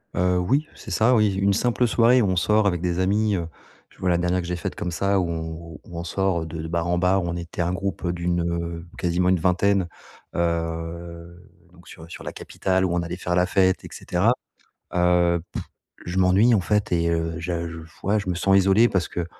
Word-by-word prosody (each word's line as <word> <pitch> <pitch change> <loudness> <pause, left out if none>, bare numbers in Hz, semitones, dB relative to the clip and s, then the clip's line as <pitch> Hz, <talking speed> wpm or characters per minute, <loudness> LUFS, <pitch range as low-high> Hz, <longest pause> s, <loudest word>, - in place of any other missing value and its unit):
Heu, 90 0 +2
oui, 135 +13 +1
c'est - - -10
ça, 120 +4 +3
oui, 105 -3 +3
une 100 +1 +2
simple 120 +4 +1
soirée 120 +2 +4
où 105 - +2
on 95 - +1
sort 105 +4 +3
avec 90 -4 0
des 90 0 -1
amis, 105 +3 +2
heu, 85 -3 -2 0.4
je - - -24
vois 95 - 0
la 85 - +3
dernière 90 +1 0
que 85 - -7
j'ai 90 - -2
faite 85 - -5
comme 90 - -3
ça 100 +3 +1
où 90 - 0
on 80 -1 -3
où 80 0 -10
où 85 - -9
on - - -4
sort, 95 0 0
heu, - - -6
de 80 0 -6
de 80 - -5
bar 85 0 -1
en 90 0 +1
bar, 90 +1 +2
on 85 0 -3
était 85 0 -5
un 85 +1 0
groupe, 95 0 -3
heu, 85 - 0
d'une, 85 0 -1
heu, 85 0 -4
quasiment 90 +1 +1
une 90 -1 +3
vingtaine, 95 +2 +2 0.5
heu, 85 +1 -4 0.2
donc 85 0 -19
sur, 80 - -12
heu, 80 - -13
sur - - -9
la - - -5
capitale 95 0 -1
où 90 - -1
on 85 - +1
allait 85 +1 -5
faire 90 -1 -2
la 90 0 +3
fête 95 0 +2
et - - -9
cetera. 95 +7 +1 0.6
Heu, 90 -1 +3
pff, - - -4 0.4
je 85 +2 -4
m'ennuie 95 +6 +4
en 100 - +2
fait 105 +3 0
et 85 -1 +2
heu, 80 0 -1
je 85 0 -3
j 80 -1 -9
f 80 - -23
ouais, 105 +3 +2
je 100 - -7
me 90 - 0
sens 95 +3 +3
isolé 100 +5 +5
parce 95 -2 0
que, 85 - -3
90 Hz, 245 wpm, -24 LUFS, 85-95 Hz, 0.6 s, isolé